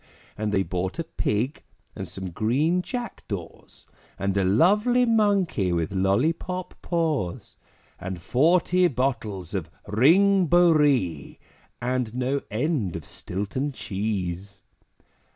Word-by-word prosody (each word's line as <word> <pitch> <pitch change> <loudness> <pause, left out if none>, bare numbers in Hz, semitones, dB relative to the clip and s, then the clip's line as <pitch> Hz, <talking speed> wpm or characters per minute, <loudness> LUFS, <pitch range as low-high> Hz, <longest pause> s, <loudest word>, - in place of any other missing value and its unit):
And 105 0 -2
they 95 -1 +2
bought 90 +2 -3
a 165 - -1
Pig, 125 -4 -2 0.3
and 95 - -5
some 95 +1 -6
green 140 - +1
Jack 245 +4 -6
daws, 90 -6 -8 0.3
And 100 0 -1
a 100 - +2
lovely 210 - +4
Monkey 200 - +2
with 85 -1 -1
lollipop 155 - 0
paws, 155 - -2 0.4
And 90 -1 -5
forty 175 - +3
bottles 115 - -2
of 90 -5 -3 0.2
Ring 175 - +4
Bo 175 +2 +5
Ree, 130 - +1 0.4
And 125 -2 -2
no 130 +2 0
end 115 - -1
of 80 -3 -6
Stilton 105 +10 -4
Cheese. 100 -3 -4
120 Hz, 115 wpm, -25 LUFS, -, 0.4 s, Bo